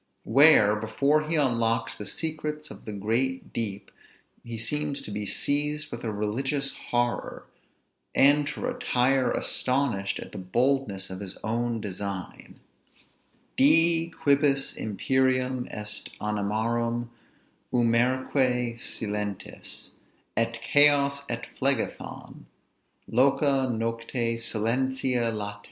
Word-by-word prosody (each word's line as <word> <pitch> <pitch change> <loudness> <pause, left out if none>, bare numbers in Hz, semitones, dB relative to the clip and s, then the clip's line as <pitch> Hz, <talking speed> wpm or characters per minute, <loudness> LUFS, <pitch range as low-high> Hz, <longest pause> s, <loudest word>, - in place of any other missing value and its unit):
Where, 120 -5 +6
before 140 +8 +1
he 165 - +2
unlocks 115 -5 +1
the 105 - -7
secrets 150 +3 -3
of - - -12
the 110 - -5
great 115 +6 -1
deep, 100 -3 -4 0.5
he 115 -1 -6
seems 145 +5 -1
to - - -7
be 105 0 -3
seized 150 +4 -1
with 120 - -6
a 115 - -2
religious 135 +7 -1
horror, 120 0 -1 0.7
and 145 +1 +5
to 145 - -5
retire 135 - +1
astonished 125 -7 0
at - - -8
the - - -7
boldness 100 -1 0
of 95 - -6
his 100 -2 -6
own 115 +1 -1
design: 100 -2 -6 1.0
Dii, 165 +4 +4
quibus 140 -3 +2
imperium 130 +3 0
est 105 0 -5
animarum, 115 +3 -1 0.6
umbræque 125 0 +1
silentes! 105 -2 -5 0.4
Et 115 0 +1
Chaos, 140 -1 +4
et 115 -1 -3
Phlegethon! 135 -3 -3 0.6
loca 135 +1 +3
nocte 115 +1 -2
silentia 125 +2 0
late! 105 -1 -4
120 Hz, 105 wpm, -27 LUFS, 110-140 Hz, 1.0 s, Where